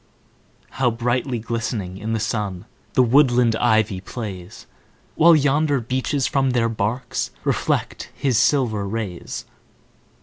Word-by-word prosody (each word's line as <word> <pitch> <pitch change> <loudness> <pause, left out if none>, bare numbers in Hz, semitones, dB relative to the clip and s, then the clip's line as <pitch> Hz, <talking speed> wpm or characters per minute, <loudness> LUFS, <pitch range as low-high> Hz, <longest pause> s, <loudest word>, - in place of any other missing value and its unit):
How 125 - +4
brightly 120 +2 -1
glistening 110 -4 -4
in 110 +2 -3
the 110 - 0
sun 105 -4 -3 0.3
The 130 - +5
woodland 125 -2 +4
ivy 110 -5 +2
plays! 95 -4 -8 0.5
While 165 +1 +6
yonder 145 0 +2
beeches 130 +3 -1
from 135 -2 +1
their 115 -2 +2
barks 115 +3 -2
Reflect - - -1
his 130 -6 +1
silver 110 -8 +1
rays. 100 -4 -5
115 Hz, 115 wpm, -22 LUFS, 105-130 Hz, 0.5 s, While